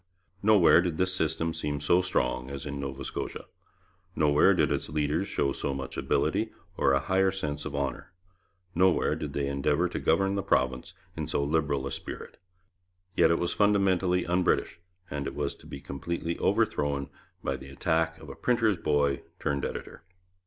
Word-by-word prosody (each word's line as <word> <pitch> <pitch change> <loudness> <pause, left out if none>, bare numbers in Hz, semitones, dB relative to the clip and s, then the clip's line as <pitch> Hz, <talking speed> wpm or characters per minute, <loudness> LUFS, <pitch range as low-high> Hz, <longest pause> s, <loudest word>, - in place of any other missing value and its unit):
Nowhere 100 -5 +6
did 85 -3 -2
this 95 +1 +1
system 80 -1 0
seem 75 -3 -3
so 85 +5 +3
strong 80 -8 -1
as 70 +1 -6
in 70 -1 -4
Nova 70 0 -5
Scotia; - - -5 0.7
nowhere 75 -1 +4
did - - +2
its - - -1
leaders 75 +5 0
show 70 -8 0
so 70 - -3
much 65 0 -6
ability - - 0 0.2
or - - +3
a 70 - +4
higher 95 +5 +2
sense 75 -6 -4
of 70 - -4
honour; 70 -1 -3 0.6
nowhere 90 +1 +3
did - - -5
they 70 - -1
endeavour 70 +5 +1
to - - -3
govern 95 +4 +2
the 100 - 0
province 65 +3 0 0.2
in 80 -2 -3
so 75 -2 0
liberal 70 -2 0
a 70 - -4
spirit. - - -7 0.8
Yet - - +5
it 85 - +3
was 85 - -1
fundamentally 95 -3 +2
un 90 +1 +1
British, 85 - 0 0.3
and 70 -1 -3
it - - -5
was - - -1
to - - -17
be 70 - -7
completely 85 +4 -4
overthrown 70 -1 +1 0.3
by 70 - -1
the 65 0 -10
attack 80 +4 0
of 75 - -12
a 70 - -8
printer's 115 -5 +2
boy 70 -3 +1 0.2
turned 70 -1 -1
editor. - - -5
75 Hz, 175 wpm, -28 LUFS, 70-90 Hz, 0.8 s, Nowhere